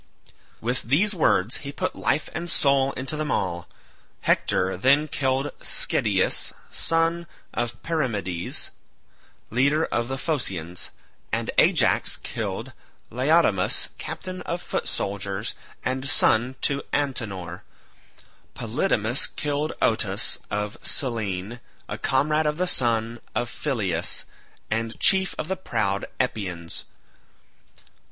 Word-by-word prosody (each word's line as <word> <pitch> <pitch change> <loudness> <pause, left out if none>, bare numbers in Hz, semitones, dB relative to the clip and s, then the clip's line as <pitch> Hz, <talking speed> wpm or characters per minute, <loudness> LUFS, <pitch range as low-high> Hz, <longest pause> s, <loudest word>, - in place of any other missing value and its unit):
With 120 +3 0
these 175 - +3
words 120 - +2
he 140 - -5
put - - -2
life 135 +7 +1
and 170 +2 -3
soul 140 -3 +3
into 130 +3 -2
them 155 0 -2
all. 85 -8 -1 0.5
Hector 95 +1 +2
then 140 +10 +4
killed 135 0 0
Schedius - - +2 0.2
son 165 +1 +1 0.3
of 120 -2 -3
Perimedes, 105 - -1 0.8
leader 140 +7 +3
of 120 0 -1
the 135 +1 -3
Phoceans, 95 - -2 0.4
and - - 0
Ajax - - +4
killed - - -4 0.4
Laodamas 130 - +3
captain 185 -1 -5
of 170 - -3
foot - - -3
soldiers 100 +1 -2 0.3
and 130 +1 -1
son 125 -3 +3
to 140 -1 +1
Antenor. 100 - -2 0.9
Polydamas - - +1
killed 150 +1 -1
Otus 110 -1 +1
of 105 0 -3
Cyllene 110 -3 -2 0.3
a - - -5
comrade 150 +3 +2
of 150 0 0
the 180 - +2
son 115 -6 +2 0.2
of 120 0 -1
Phyleus 100 - 0 0.5
and 115 +1 -1
chief 190 -1 +4
of - - -3
the 190 - 0
proud 100 - -1
Epeans. 90 -9 -2
125 Hz, 110 wpm, -25 LUFS, 105-150 Hz, 0.9 s, then